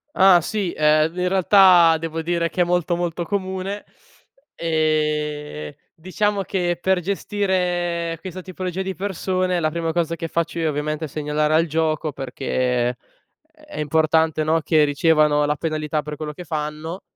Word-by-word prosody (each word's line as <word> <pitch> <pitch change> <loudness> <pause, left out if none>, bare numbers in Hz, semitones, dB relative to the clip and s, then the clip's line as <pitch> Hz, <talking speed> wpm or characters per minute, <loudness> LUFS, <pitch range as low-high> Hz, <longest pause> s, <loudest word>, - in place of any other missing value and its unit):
Ah 185 -2 +6
sì, 195 +1 -2
ehm, 155 +1 +3
ve 180 - -4
in - - +1
realtà 185 -3 +6
devo 165 0 -4
dire 170 0 -1
che 180 - -1
è - - +6
molto 175 0 0
molto 175 0 -2
comune. 190 +1 -4 0.7
Ehm, 150 - -1 0.2
diciamo 200 +4 -1
che 175 -2 -1
per 190 0 +2
gestire 180 -3 -1
questa 185 +1 -7
tipologia 185 0 -5
di 190 0 -3
persone 185 -2 -1
la 155 - +1
prima 165 0 -2
cosa 170 -1 -1
che 165 - -4
faccio 170 +1 -2
io 165 - 0
ovviamente 150 +1 -2
è - - -6
segnalare 150 +1 -1
al 160 +1 +4
gioco 155 -1 -1
perché 125 -2 -1
è 125 - -6 0.6
è 305 -1 -23
è 300 - -8
importante, 160 +1 +2
no, 160 +1 +2
che 155 0 +3
ricevano 150 0 +3
la 150 0 0
penalità 155 -1 -2
per 150 +1 -7
quello 150 0 -6
che 180 - -9
fanno 155 +3 -4
165 Hz, 165 wpm, -22 LUFS, 150-180 Hz, 0.7 s, Ah